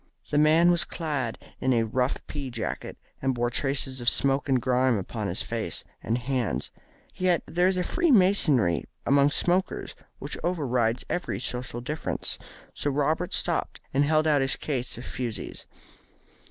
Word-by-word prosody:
The 145 - +3
man 160 +3 +6
was 170 -1 +3
clad 145 -11 -3 0.2
in 130 0 +2
a 115 -1 +3
rough 125 +4 -1
pea 140 -3 -5
jacket, 115 -2 -4 0.2
and 130 -1 +1
bore 120 0 0
traces 135 0 0
of 120 - +4
smoke 140 +1 +1
and 130 -1 +4
grime 125 0 +2
upon 95 - -4
his - - -3
face - - -3 0.2
and 115 - 0
hands. 125 -2 -1 0.4
Yet 180 -2 +1
there 175 +3 +2
is 190 -1 +1
a 180 - +1
Freemasonry 185 - +3 0.2
among 140 +1 +5
smokers 180 +5 0 0.2
which - - -6
overrides 125 -9 0
every 175 - -2
social 125 -1 -3
difference, 150 +5 -3 0.3
so 145 - -2
Robert 155 +5 0
stopped - - 0
and 140 +2 +4
held 155 +1 +3
out 150 -3 +4
his 135 0 +1
case 130 -6 -3
of 120 - -8
fusees. 120 -4 -5
135 Hz, 155 wpm, -27 LUFS, 125-160 Hz, 0.4 s, man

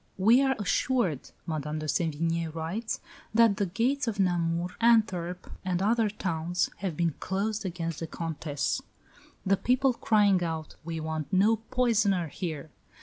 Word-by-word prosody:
"We 225 +7 +5
are 265 -1 +2
assured," 205 - 0 0.2
Madame 155 -1 -3
de 155 - -4
Sevigné 165 +1 0
writes, 180 +8 -3 0.3
"that 225 -3 +5
the 200 - 0
gates 250 +9 0
of 210 -3 -2
Namur, 175 -2 +1
Antwerp, 190 -7 +2
and 180 -1 0
other 220 +2 +2
towns 175 -3 -1
have 185 -5 -3
been 170 -2 +1
closed 205 +2 -2
against 165 -3 -4
the 165 - -4
Countess, 155 -3 -2 0.6
the 195 0 +3
people 255 +4 +2
crying 205 -5 +3
out, 160 -2 -4
'We 165 0 -4
want 155 0 -4
no 205 +4 +4
poisoner 220 -7 +1
here'!" 155 -2 -5
185 Hz, 145 wpm, -28 LUFS, 165-220 Hz, 0.6 s, We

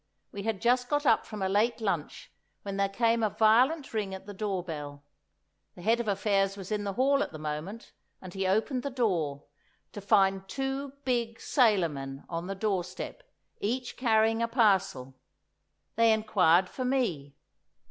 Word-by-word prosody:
We 200 - -6
had 215 -2 -2
just 245 +1 +2
got 290 0 0
up 225 - +3
from 210 -3 -5
a - - +1
late 215 +5 +1
lunch 215 -3 -3 0.3
when 200 -1 -5
there 200 0 +1
came 230 +3 +1
a 215 - +2
violent 250 +8 +3
ring 205 -3 -2
at 190 - -11
the 205 - -8
door 195 -3 -2
bell. 145 -4 -7 0.7
The 175 - -12
Head 230 +3 +3
of 235 - -3
Affairs 195 -1 +1
was 195 +1 -8
in 210 -1 -1
the 200 - -2
hall 275 +5 +2
at - - -2
the 155 - -8
moment, 155 +8 -6 0.3
and 185 -1 -10
he 190 -1 -1
opened 225 +7 +1
the 280 - -3
door—to 165 - -4
find 195 -2 +2
two 270 +4 -3
big 235 -3 -1
sailor 215 -9 +3
men 135 -1 -7
on 170 +1 -4
the 195 - -4
doorstep, 190 - -3 0.4
each 245 +4 -2
carrying 225 -2 +2
a 230 - +1
parcel. 195 - +1 0.8
They 230 0 +5
inquired 190 -5 +3
for 255 - -5
me. 180 - -1
205 Hz, 170 wpm, -29 LUFS, 185-230 Hz, 0.8 s, They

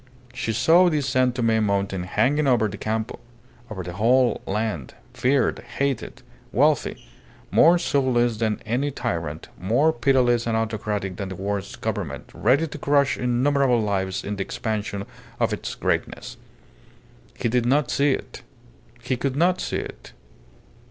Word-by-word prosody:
She 125 -2 -2
saw 165 - +5
the 155 -3 +1
San 130 -1 +2
Tome 115 -3 +1
mountain 100 -3 -1
hanging 135 +10 +1
over 120 -4 +3
the 100 - -6
Campo, 110 +2 -3 0.5
over 95 -4 -5
the 90 0 -6
whole 120 +6 +3
land, 100 - -3 0.2
feared, 130 0 +1 0.2
hated, 140 -4 -2 0.3
wealthy; - - +1 0.5
more 170 +2 +6
soulless 125 -8 +1
than 110 -1 0
any 125 +6 0
tyrant, 80 - -4
more 125 - +2
pitiless 120 -1 +2
and 115 -1 +1
autocratic 105 -4 -2
than 100 -2 -4
the 95 - -6
worst 100 +1 -4
Government; - - -4
ready 135 +8 +2
to 155 - -7
crush 140 0 +2
innumerable 125 +1 +2
lives 95 -3 -1
in 105 0 -4
the 95 - -1
expansion 105 -1 -3 0.3
of - - +1
its - - -5
greatness. - - -2 1.0
He - - -1
did 120 +1 +1
not 140 +1 +2
see 140 0 +3
it. - - -6 0.6
He 125 +1 -1
could 135 +1 -2
not 175 +4 +2
see - - -2
it. - - -8
120 Hz, 145 wpm, -24 LUFS, 105-135 Hz, 1.0 s, more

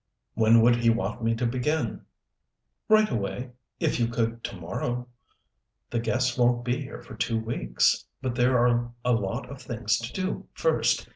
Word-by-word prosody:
"When 115 +1 +5
would 120 0 +5
he 120 -1 +3
want 115 +1 -1
me 115 0 +2
to 120 +2 -1
begin?" 125 +1 -1 0.8
"Right 215 0 +6
away, 120 +4 -3 0.3
if - - 0
you 120 - +2
could 115 0 -2
to - - -5
morrow. 120 +7 -3 0.8
The 120 - 0
guests 125 +2 0
won't 120 0 +3
be 125 +3 0
here 140 +1 -8
for - - -11
two 115 -1 -1
weeks, 60 - +1
but 130 -2 -2
there 125 +1 +3
are 120 0 +2
a 125 - +3
lot 100 -4 -2
of 140 - -9
things 115 -3 -1
to 115 +1 -6
do 185 0 -3
first. - - +1
120 Hz, 170 wpm, -27 LUFS, 115-125 Hz, 0.8 s, Right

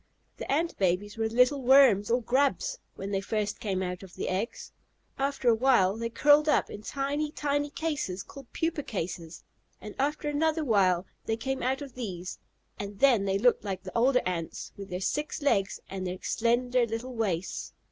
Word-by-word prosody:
The - - -5
Ant 330 +4 +1
babies 195 +2 0
were 225 0 -1
little 250 +4 +3
worms 250 -6 +6
or 240 +1 +2
grubs 280 - +1 0.2
when 195 +1 -5
they 195 -1 0
first 210 0 -2
came 190 -3 -1
out 180 -1 -4
of 190 -3 -12
the - - -3
eggs; 195 +6 -3 0.5
after 275 -2 -1
a 235 - +7
while 225 -5 +3
they 230 +1 -3
curled 295 +5 +5
up 300 - +2
in 205 - -7
tiny, 280 +5 -2
tiny 290 -1 -1
cases, 285 - -3
called 275 -3 -13
pupa 325 -2 -1
cases, 170 - -5 0.4
and 210 - -8
after 295 +2 0
another 310 +2 +1
while 190 -6 +3 0.2
they 225 - 0
came 265 +3 -3
out 265 +3 0
of 275 -3 -10
these, 185 -7 -6 0.4
and 200 0 -6
then 240 -6 +4
they 195 0 +1
looked 240 +4 +3
like 190 -3 -4
the 185 - -9
older 250 +2 +4
Ants, 170 -3 -4
with 200 0 -9
their 180 0 -4
six 295 +10 -2
legs, 200 -8 +1
and 190 -1 -4
their 180 +1 -4
slender 240 +1 +1
little 230 +3 -4
waists. 190 -6 -2
230 Hz, 185 wpm, -28 LUFS, 195-275 Hz, 0.5 s, a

